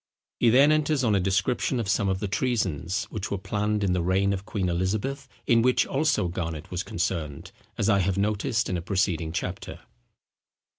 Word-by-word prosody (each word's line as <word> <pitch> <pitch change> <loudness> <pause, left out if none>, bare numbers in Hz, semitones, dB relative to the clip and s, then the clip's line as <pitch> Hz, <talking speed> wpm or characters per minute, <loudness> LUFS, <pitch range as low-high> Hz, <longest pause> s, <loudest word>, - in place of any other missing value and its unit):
He 120 - +4
then 135 +6 +6
enters 155 -2 +2
on 110 -3 +2
a 100 - +3
description 95 +7 0
of 115 - -2
some 100 0 +1
of 95 -1 -1
the 105 - -2
treasons, 95 - -1
which 105 -3 -4
were 100 - -1
planned 105 +2 -1
in 95 -2 +1
the 90 - +1
reign 95 +3 +2
of 100 +1 -5
Queen 100 -4 -1
Elizabeth, 100 +10 -2 0.2
in 115 -3 +4
which 125 +1 +3
also 140 - +1
Garnet 85 -3 -5
was 90 0 -2
concerned, 80 -6 -3 0.3
as 105 - 0
I 100 -3 +4
have 95 +1 0
noticed 105 +2 0
in 90 - -1
a - - -4
preceding 90 -3 0
chapter. 90 +2 -5
100 Hz, 190 wpm, -26 LUFS, 90-115 Hz, 0.3 s, then